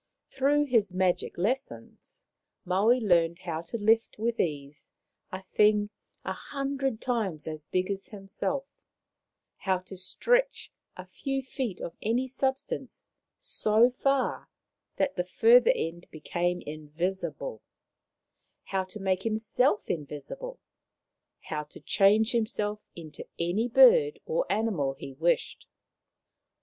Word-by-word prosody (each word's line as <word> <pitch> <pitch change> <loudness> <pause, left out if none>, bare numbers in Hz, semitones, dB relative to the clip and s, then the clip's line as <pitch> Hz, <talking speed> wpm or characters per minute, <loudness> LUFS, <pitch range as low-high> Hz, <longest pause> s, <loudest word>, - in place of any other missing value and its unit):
Through 280 +2 +3
his 225 -8 +2
magic 185 -1 +1
lessons 255 - -4 0.4
Maui 205 +7 +3
learned 170 -6 +3
how 170 -3 -4
to 170 +8 -5
lift 225 +1 +2
with 230 +2 -1
ease 145 -2 -3 0.4
a 185 - -4
thing 210 +2 +2 0.3
a - - -1
hundred 275 -4 -3
times 215 -13 -2
as 155 -1 -5
big 185 +3 0
as 195 0 -4
himself; 210 +7 -3 0.9
how 190 -1 0
to 185 +1 -11
stretch - - 0 0.3
a - - -8
few 270 -1 -3
feet 255 -7 -4
of 170 - -6
any 240 +4 0
substance 265 +1 -2 0.3
so 235 - +3
far 275 +1 0 0.5
that 280 -5 0
the 180 - +1
further 230 +7 +5
end 170 +2 -4
became 175 +3 -2
invisible; 155 - -4 1.0
how 190 -1 -1
to 185 +3 -9
make 190 -1 0
himself 220 0 +1
invisible; 160 - -5 0.8
how 150 -1 -4
to 150 - -14
change 215 +4 +4
himself 215 -3 -1 0.2
into 160 -3 -9
any 180 +8 0
bird 465 - +6
or - - -1
animal 190 -12 0
he 135 0 -9
wished. 165 +6 0
205 Hz, 120 wpm, -28 LUFS, 175-250 Hz, 1.0 s, bird